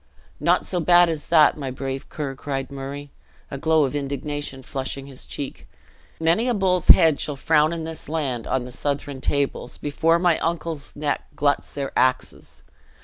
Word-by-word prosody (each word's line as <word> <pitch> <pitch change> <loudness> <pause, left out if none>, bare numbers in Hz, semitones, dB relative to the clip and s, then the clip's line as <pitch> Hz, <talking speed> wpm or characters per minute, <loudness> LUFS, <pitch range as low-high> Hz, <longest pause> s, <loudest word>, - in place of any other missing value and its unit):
"Not - - +2
so 180 - -1
bad 175 +1 +5
as 155 -2 -3
that, 155 -3 +5
my 135 -2 -3
brave 135 +1 -5
Ker," 145 -3 -4
cried 135 0 -4
Murray, 140 +1 -7 0.4
a 140 - -5
glow 160 +1 +3
of 140 +1 -1
indignation 140 -1 -4
flushing 135 +1 -4
his 135 -2 -10
cheek; 140 - -6 0.5
"many 165 +9 +2
a 240 - +1
bull's 185 -3 +1
head 160 -3 +7
shall 150 - -2
frown 155 +2 +3
in 165 -1 -4
this 160 -1 -7
land, 135 -8 -2
on 130 - 0
the 125 - -8
Southron 140 0 -3
tables, 140 -3 -1
before 160 +3 +1
my 170 -2 +2
uncle's 165 -3 -3
neck 145 0 -2
gluts 145 0 0
their 140 -1 -3
axes! 130 0 -1
145 Hz, 170 wpm, -23 LUFS, 135-160 Hz, 0.5 s, head